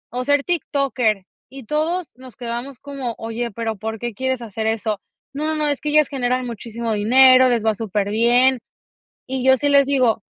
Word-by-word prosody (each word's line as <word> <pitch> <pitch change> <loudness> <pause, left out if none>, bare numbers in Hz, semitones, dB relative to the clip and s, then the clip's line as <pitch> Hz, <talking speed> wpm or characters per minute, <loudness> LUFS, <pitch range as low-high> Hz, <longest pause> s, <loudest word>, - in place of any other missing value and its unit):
o 250 - -2
ser 285 0 +2
tiktoker, 260 - 0 0.2
y 270 0 -10
todos 320 +6 -1
nos 255 -2 -13
quedamos 245 +1 -6
como: 275 -5 -6
"Oye, 230 +1 -4
pero 225 +1 -3
¿por 220 +2 -5
qué 240 0 -4
quieres 260 +2 -2
hacer 220 0 -4
eso?". 220 -2 -1 0.3
No, 300 +2 -3
no, 315 - -1
no, 300 -1 0
es 285 -2 -1
que 300 - -2
ellas 305 -1 +4
generan 255 -2 -1
muchísimo 230 0 -5
dinero, 255 +4 +6
les 235 -3 0
va 220 - +3
superbién. 225 +5 +2 0.7
Y 260 0 -3
yo 265 0 +6
sí 285 - -1
les 280 -1 +5
digo 255 -6 +2
250 Hz, 185 wpm, -20 LUFS, 225-275 Hz, 0.7 s, dinero